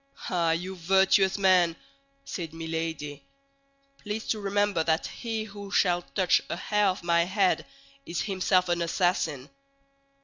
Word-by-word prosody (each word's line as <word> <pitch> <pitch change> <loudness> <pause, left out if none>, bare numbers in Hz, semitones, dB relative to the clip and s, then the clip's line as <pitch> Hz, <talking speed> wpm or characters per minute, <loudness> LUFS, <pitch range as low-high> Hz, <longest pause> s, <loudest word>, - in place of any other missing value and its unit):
"Ah, 170 -2 +1
you 180 +3 -2
virtuous 190 +2 +3
men!" 185 -4 +4 0.5
said 165 -3 -6
Milady; 160 -3 -4 0.8
"please 210 +1 -5
to 220 - 0
remember 205 -3 +1
that 160 0 +1
he 225 -2 -4
who 205 -1 -9
shall 180 -3 +2
touch 185 0 +1
a - - -2
hair 210 +3 +1
of 185 -2 -1
my 170 0 +3
head 190 0 +1 0.4
is 170 - -3
himself 185 -2 +1
an 175 0 0
assassin." 165 -5 0
180 Hz, 135 wpm, -27 LUFS, 165-200 Hz, 0.8 s, men